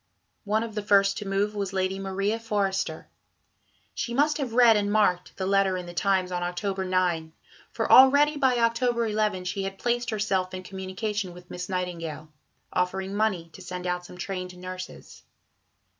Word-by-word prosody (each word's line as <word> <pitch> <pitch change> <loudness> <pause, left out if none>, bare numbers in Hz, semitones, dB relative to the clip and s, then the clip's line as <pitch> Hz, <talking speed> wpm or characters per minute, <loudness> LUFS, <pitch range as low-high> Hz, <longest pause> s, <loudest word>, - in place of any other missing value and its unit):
One 215 +2 +1
of 230 -1 -6
the 210 - -2
first 200 0 +3
to 210 - -6
move 200 +2 0
was 200 -2 -3
Lady 190 0 -1
Maria 195 +3 -1
Forester. 200 -4 -1 0.9
She 235 - -3
must 300 +3 +2
have 260 -5 -3
read 240 -2 +7
and 205 -1 +1
marked 190 -4 +1
the 190 - -2
letter 195 -1 +2
in 180 - -5
the 175 - -9
Times 185 0 +1
on 180 0 -2
October 190 +2 -2
9, 180 -4 0 0.4
for - - -2
already 285 +3 +7
by 265 -4 +2
October 235 0 +2
11 210 -3 0
she 190 +2 -2
had 195 0 -4
placed 240 +2 -1
herself 195 -4 -1
in 185 - -6
communication 190 0 -4
with 180 0 -14
Miss 180 +1 -5
Nightingale, 165 -4 -4 0.4
offering 190 +2 -1
money 190 -6 0
to - - -11
send 180 0 -6
out 180 0 -1
some 180 - -12
trained 180 -1 -5
nurses. 185 0 -8
195 Hz, 175 wpm, -26 LUFS, 180-215 Hz, 0.9 s, read